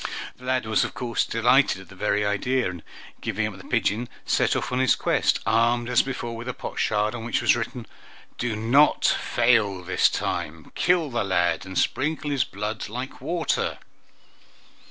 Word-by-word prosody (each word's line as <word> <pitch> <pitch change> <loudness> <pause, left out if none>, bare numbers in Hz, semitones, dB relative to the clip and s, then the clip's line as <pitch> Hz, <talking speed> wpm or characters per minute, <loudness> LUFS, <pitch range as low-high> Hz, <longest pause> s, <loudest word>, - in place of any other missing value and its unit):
The 125 - -14
lad 130 -2 0
was 110 0 +2
of - - -5
course 120 -2 -1
delighted 120 -1 +3
at 95 - -13
the 95 - -13
very 105 +1 0
idea, 125 +5 0
and, 90 -3 -6 0.4
giving - - -1
up - - -4
the - - -11
pigeon, 115 +4 0 0.2
set - - +2
off - - -2
on 125 - 0
his 130 -2 +4
quest, - - +1
armed 115 +3 +2
as 125 - +5
before 120 -3 -5
with 115 +2 -7
a 125 - -4
potsherd, 105 +1 -1
on 115 -2 -6
which 120 - 0
was - - +4
written, 120 0 -4 0.5
"Do 115 -2 -1
not 120 +8 +3
fail 110 -6 +2
this 95 +2 +3
time. 80 0 -4
Kill 170 -5 +2
the 120 -2 0
lad, 90 -2 0
and 95 - -6
sprinkle 150 +1 0
his 135 -4 +2
blood 105 +2 -5
like 125 +4 -6
water!" 170 -1 -1
115 Hz, 175 wpm, -25 LUFS, 105-125 Hz, 0.5 s, as